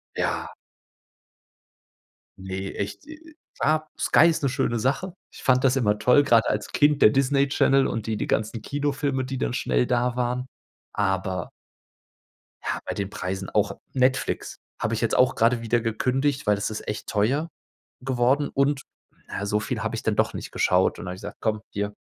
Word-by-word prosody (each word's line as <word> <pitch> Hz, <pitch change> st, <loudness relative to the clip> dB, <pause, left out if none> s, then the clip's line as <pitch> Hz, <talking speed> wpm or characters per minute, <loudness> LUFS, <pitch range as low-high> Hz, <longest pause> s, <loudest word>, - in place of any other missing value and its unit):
Ja. -, -, -2 dB, 1.8 s
Ne, 95 Hz, 0 st, -5 dB
echt, 100 Hz, -, -5 dB
äh, 315 Hz, -, -8 dB
äh, 315 Hz, 0 st, -16 dB, 0.3 s
ah, 155 Hz, 0 st, +1 dB
Sky 160 Hz, -, +5 dB
ist 160 Hz, -3 st, 0 dB
'ne 135 Hz, -, +2 dB
schöne 130 Hz, -3 st, 0 dB
Sache. 140 Hz, -, -1 dB, 0.2 s
Ich -, -, -13 dB
fand 130 Hz, -1 st, +3 dB
das 135 Hz, 0 st, +3 dB
immer 105 Hz, -5 st, +2 dB
toll, 125 Hz, +6 st, +5 dB
grad 115 Hz, -5 st, +4 dB
als 105 Hz, 0 st, -2 dB
Kind. 145 Hz, 0 st, +3 dB
Der -, -, +9 dB
Disney 140 Hz, +1 st, +2 dB
Channel 135 Hz, 0 st, +3 dB
und 110 Hz, -1 st, -4 dB
die 110 Hz, -1 st, -1 dB
die -, -, -3 dB
ganzen 110 Hz, +1 st, -1 dB
Kinofilme, 140 Hz, -1 st, -1 dB
die 130 Hz, +1 st, -4 dB
dann -, -, -1 dB
schnell 60 Hz, -1 st, +1 dB
da 125 Hz, 0 st, +1 dB
waren. 125 Hz, +1 st, -1 dB, 0.5 s
Aber 95 Hz, -3 st, -1 dB, 1.1 s
ja, -, -, -2 dB
bei -, -, -3 dB
den 100 Hz, -1 st, -3 dB
Preisen. 95 Hz, -1 st, -4 dB
Auch 105 Hz, -1 st, +1 dB, 0.2 s
Netflix 130 Hz, 0 st, 0 dB, 0.2 s
habe 110 Hz, -, -1 dB
ich 110 Hz, -, -1 dB
jetzt 115 Hz, -, +1 dB
auch 125 Hz, -, +4 dB
grade 115 Hz, +1 st, +2 dB
wieder 115 Hz, 0 st, +1 dB
gekündigt, 130 Hz, +4 st, 0 dB
weil 105 Hz, -, +5 dB
das 100 Hz, -, -2 dB
ist 110 Hz, -, -6 dB
echt 105 Hz, -1 st, -4 dB
teuer 135 Hz, +11 st, 0 dB, 0.5 s
geworden, 130 Hz, +3 st, +1 dB
und, 140 Hz, 0 st, +1 dB, 0.4 s
na, 100 Hz, -, -4 dB
so 105 Hz, +1 st, +1 dB
viel -, -, -3 dB
habe -, -, -2 dB
ich -, -, -5 dB
dann -, -, +1 dB
doch -, -, +1 dB
nicht -, -, -7 dB
geschaut -, -, +2 dB
und -, -, -7 dB
da -, -, -5 dB
habe -, -, -5 dB
ich 95 Hz, -, -13 dB
gesagt: 105 Hz, -, -8 dB
„Komm, 110 Hz, -1 st, 0 dB
hier, 105 Hz, 0 st, -3 dB
120 Hz, 190 wpm, -25 LUFS, 105-135 Hz, 1.8 s, Der